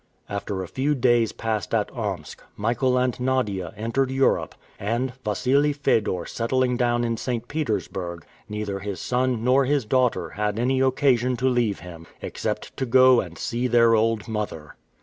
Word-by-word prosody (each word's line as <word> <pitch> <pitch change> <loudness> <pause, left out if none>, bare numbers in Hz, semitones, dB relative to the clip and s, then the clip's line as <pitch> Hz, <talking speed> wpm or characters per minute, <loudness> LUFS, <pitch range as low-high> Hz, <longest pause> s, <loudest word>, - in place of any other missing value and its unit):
After 100 -1 -3
a - - -7
few 135 - 0
days 120 -3 +3
passed 110 -2 -2
at - - 0
Omsk, - - -4 0.2
Michael 120 +4 +1
and 125 0 0
Nadia 105 -9 -1
entered 115 +5 0
Europe, 135 0 +1 0.2
and, 120 +5 -1
Wassili 135 +7 +2
Fedor 105 -10 0
settling 125 +2 0
down 120 -1 +1
in 115 -1 -1
St. 120 0 -3
Petersburg, 95 - -3 0.2
neither 105 -2 -3
his 100 -2 -5
son 125 -2 0
nor 130 +2 +4
his 140 -2 +1
daughter 125 +1 +1
had 105 0 -2
any 130 +3 +1
occasion 130 -2 +2
to 130 - -2
leave 120 -7 +1
him, 85 -2 -10
except - - -4
to 130 - -2
go 130 0 +6
and 85 -3 -9
see 120 +7 -1
their 115 -1 +5
old 115 0 +1
mother. 105 -9 -4
120 Hz, 160 wpm, -24 LUFS, 105-130 Hz, 0.2 s, go